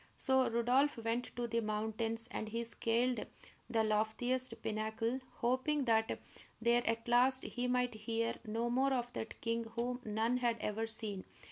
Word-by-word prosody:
So 265 -2 +3
Rodolph 245 +5 +3
went 230 +2 -1
to 240 - -1
the 230 0 +1
mountains, 220 +1 -1
and 220 - -3
he 230 +2 -2
scaled 235 +2 +1 0.5
the 225 -1 +2
loftiest 220 +4 0
pinnacle, 220 +3 -1 0.2
hoping 260 +4 +1
that 225 -2 +2 0.4
there 235 +1 +4
at 230 +1 0
last 255 +2 +4
he 250 0 -2
might 250 -1 +2
hear 225 +1 -1
no 230 +2 -1
more 265 +2 +3
of 245 -1 -1
that 220 - -5
king 230 0 0
whom 245 +1 -1
none 220 +3 +1
had 240 -2 +1
ever 220 +2 -1
seen. 215 -4 -4
230 Hz, 155 wpm, -36 LUFS, 225-245 Hz, 0.5 s, there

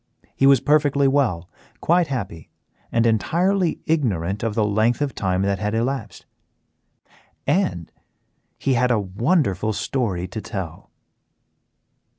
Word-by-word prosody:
He 135 - +3
was 135 -2 +6
perfectly 145 -2 +3
well, 125 -12 +1 0.3
quite 170 0 +2
happy, 115 - -5 0.4
and 115 0 +2
entirely 170 - +1
ignorant 105 - 0
of 115 -2 -2
the 110 - +2
length 110 +3 +1
of 145 -2 -1
time 95 -1 -1
that 100 -1 0
had 105 +1 -2
elapsed. 115 -4 -3 1.2
And 170 - 0 0.7
he 135 - 0
had 125 +1 +2
a 120 -3 +2
wonderful 110 - 0
story 100 -6 -2
to 110 +3 -5
tell. 95 -8 -7
115 Hz, 125 wpm, -22 LUFS, 100-140 Hz, 1.2 s, was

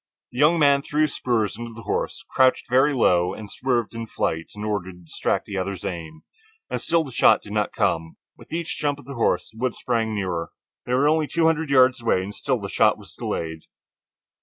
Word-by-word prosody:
The 125 - -7
young 155 +4 +5
man 140 -3 +4
threw 150 +2 0
his 150 - 0
spurs 110 -5 0
into 115 +1 -7
the 115 - -10
horse, 195 - -3
crouched 130 -1 +3
very 130 +4 +4
low, 90 -9 +2
and 105 -2 -9
swerved 120 -4 -1
in 115 - -5
his - - -27
flight 80 -4 -2
in 105 - -6
order 100 -4 -2
to 90 - -15
distract 85 -3 -2
the 100 - -5
other's 95 0 -4
aim. 80 -4 -6 0.5
And - - -2
still 165 -1 +2
the 140 - -9
shot - - +4
did 105 - -9
not 105 -1 0
come. 85 -6 -1 0.2
With - - -17
each 165 0 -3
jump 145 -1 0
of 145 - -14
the 140 - -7
horse, 100 -7 0
the 110 - -15
woods 125 -1 -1
sprang 115 -3 -1
nearer. 90 -5 -3 0.3
They 125 - +1
were 140 +3 +3
only 155 0 +2
two 165 +1 +1
hundred 160 -2 +2
yards 130 -2 +5
away 115 -5 +1
and 100 +2 -6
still 130 +2 -1
the 100 - -5
shot - - +3
was - - -15
delayed. 80 -1 -4
115 Hz, 225 wpm, -24 LUFS, 95-140 Hz, 0.5 s, young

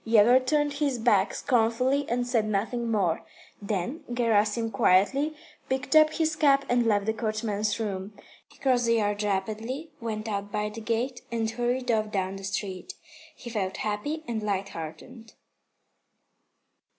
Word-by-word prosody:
Yegor 230 +3 +6
turned 295 +2 +1
his 285 -3 0
back 210 -4 +3
scornfully 255 +3 +1
and 245 +1 0
said 235 -3 +1
nothing 230 +3 -1
more. 190 -7 +1 0.4
Then 205 - -3
Gerasim 225 -1 +1
quietly 245 +11 +3 0.3
picked 265 +2 -1
up 310 0 +7
his 315 -1 0
cap 280 -3 +4
and 245 -1 +2
left 205 -2 +2
the 220 - +1
coachman's 215 -1 -1
room. 200 -2 -4 0.3
He - - -21
crossed 250 -3 +2
the 230 - +4
yard 205 -2 0
rapidly, 220 +9 -2
went 220 -1 -4
out 205 -1 -3
by 210 +1 -1
the 220 +2 -8
gate, 240 +3 -2
and 230 -1 0
hurried 245 +2 -1
off 215 -1 0
down 190 -1 -2
the 195 - -10
street. 190 -1 -4 0.4
He 240 - -9
felt 195 -4 -2
happy 290 +10 -2
and 225 -2 -2
lighthearted. 195 +3 -5
225 Hz, 150 wpm, -27 LUFS, 205-250 Hz, 0.4 s, up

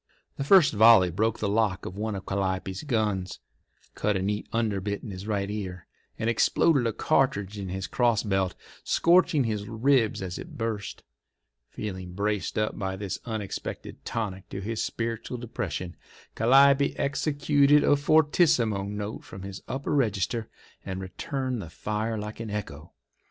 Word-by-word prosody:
The 140 - -2
first 175 +1 +6
volley 110 -4 +7
broke 110 +6 0
the 105 - -1
lock 100 -3 +1
of 90 - -6
one 105 +1 -3
of 95 - -7
Calliope's 95 -1 -2
guns, 105 - -1 0.6
cut 105 -2 0
a - - -2
neat 105 +1 -2
underbit 105 -3 -1
in 110 - -6
his 95 +2 -7
right 100 -2 -1
ear, 95 -4 -5 0.3
and 110 - -2
exploded 125 +3 +3
a - - +1
cartridge 105 -7 0
in 95 -2 -5
his 95 +1 -3
crossbelt, 105 -6 +1 0.3
scorching 170 -4 +4
his 105 -3 -2
ribs 115 -2 +2
as 90 -1 -5
it - - -9
burst. 110 -3 -4 0.7
Feeling 95 -4 -6
braced 100 0 -1
up 105 0 -1
by 95 -2 -2
this 100 0 -4
unexpected 110 -5 -5
tonic 100 -4 -4
to 95 - -5
his 110 +3 -3
spiritual 115 +1 -3
depression, 100 -6 -4 0.4
Calliope 140 +4 +5
executed 145 0 +3
a - - +5
fortissimo 145 - +3
note 105 +1 -5
from 95 +1 -10
his 95 0 -7
upper 135 +2 -3
register, 115 -3 0 0.3
and 95 -1 -5
returned 125 +6 -3
the 85 - -8
fire 110 +6 -3
like 105 +1 -6
an 115 -1 -5
echo. 85 -7 -6
105 Hz, 150 wpm, -27 LUFS, 95-120 Hz, 0.7 s, volley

